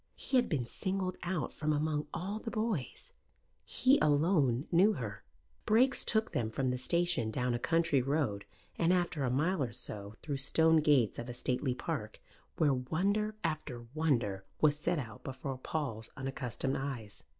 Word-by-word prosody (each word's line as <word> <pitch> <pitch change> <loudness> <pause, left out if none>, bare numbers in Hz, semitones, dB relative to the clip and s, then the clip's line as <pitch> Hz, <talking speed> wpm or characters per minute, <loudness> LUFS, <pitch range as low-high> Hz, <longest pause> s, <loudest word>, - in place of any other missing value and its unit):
He 265 - 0
had 245 - +2
been 135 -7 0
singled 185 - -2
out 175 -2 -2
from 155 0 -1
among 150 0 0
all 200 +4 -3
the 230 - -5
boys. 220 - -3 0.5
He 270 +3 +3
alone 145 -4 +3
knew 190 +5 +5
her. 110 - -6 0.4
Brakes 250 +4 +4
took 220 0 +1
them 110 -2 -1
from 130 +3 -1
the 125 - -2
station 170 -4 +1
down 125 +2 -1
a 120 - -1
country 165 -2 +2
road 130 -7 0 0.4
and, 170 +1 +3
after 175 -5 +1
a 125 - +1
mile 150 +7 +1
or 125 -3 -1
so, 105 -3 -4
through 145 -3 -2
stone 160 +4 +4
gates 145 -7 +3
of 120 +1 -6
a 120 - -6
stately 125 +1 -1
park, 125 -9 -4 0.4
where 150 -3 +3
wonder 195 +12 0
after 155 -7 -3
wonder 120 -11 0 0.2
was 150 -1 +4
set 170 +2 +1
out 115 -7 -6
before 135 0 -5
Paul's 130 -7 -3
unaccustomed 135 -1 -2
eyes. 130 -6 -5
145 Hz, 165 wpm, -32 LUFS, 125-175 Hz, 0.5 s, knew